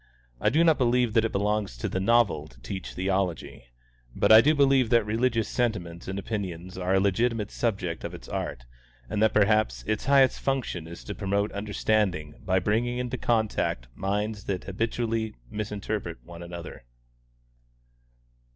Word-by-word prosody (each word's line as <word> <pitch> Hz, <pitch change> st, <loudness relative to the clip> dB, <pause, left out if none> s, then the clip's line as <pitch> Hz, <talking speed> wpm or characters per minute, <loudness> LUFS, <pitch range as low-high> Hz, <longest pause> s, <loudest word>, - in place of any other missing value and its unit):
I -, -, +3 dB
do 160 Hz, +3 st, +3 dB
not 160 Hz, -3 st, +4 dB
believe 125 Hz, -2 st, +2 dB
that 115 Hz, 0 st, +4 dB
it 115 Hz, -, -1 dB
belongs 105 Hz, -, -1 dB
to -, -, -2 dB
the 95 Hz, -, -2 dB
novel 100 Hz, -8 st, +2 dB
to -, -, -19 dB
teach 95 Hz, +7 st, -6 dB
theology; 95 Hz, -7 st, -2 dB, 0.5 s
but -, -, +3 dB
I 110 Hz, +1 st, +10 dB
do 150 Hz, +5 st, +3 dB
believe 135 Hz, -4 st, +4 dB
that 115 Hz, -2 st, +4 dB
religious 115 Hz, +1 st, +1 dB
sentiments 90 Hz, -9 st, -2 dB
and 95 Hz, +1 st, -3 dB
opinions 95 Hz, -4 st, -4 dB
are 95 Hz, +1 st, 0 dB
a -, -, +5 dB
legitimate 105 Hz, +2 st, +1 dB
subject 95 Hz, -8 st, -2 dB
of -, -, -5 dB
its -, -, -12 dB
art, -, -, -4 dB, 0.5 s
and 105 Hz, -, -1 dB
that 110 Hz, -, +5 dB
perhaps 105 Hz, -, +2 dB
its 110 Hz, 0 st, -1 dB
highest 135 Hz, -1 st, +4 dB
function 125 Hz, -12 st, -2 dB
is 85 Hz, +1 st, -10 dB
to 105 Hz, -, -5 dB
promote 100 Hz, +1 st, -1 dB
understanding 100 Hz, -6 st, -1 dB
by 95 Hz, -1 st, +1 dB
bringing 115 Hz, +6 st, 0 dB
into 125 Hz, 0 st, -3 dB
contact 110 Hz, -, 0 dB
minds 105 Hz, -, -2 dB
that 95 Hz, -2 st, -2 dB
habitually 115 Hz, +2 st, -2 dB, 0.2 s
misinterpret 105 Hz, -4 st, -4 dB
one 85 Hz, -1 st, -11 dB
another. 85 Hz, -6 st, -8 dB
105 Hz, 160 wpm, -27 LUFS, 95-115 Hz, 0.5 s, I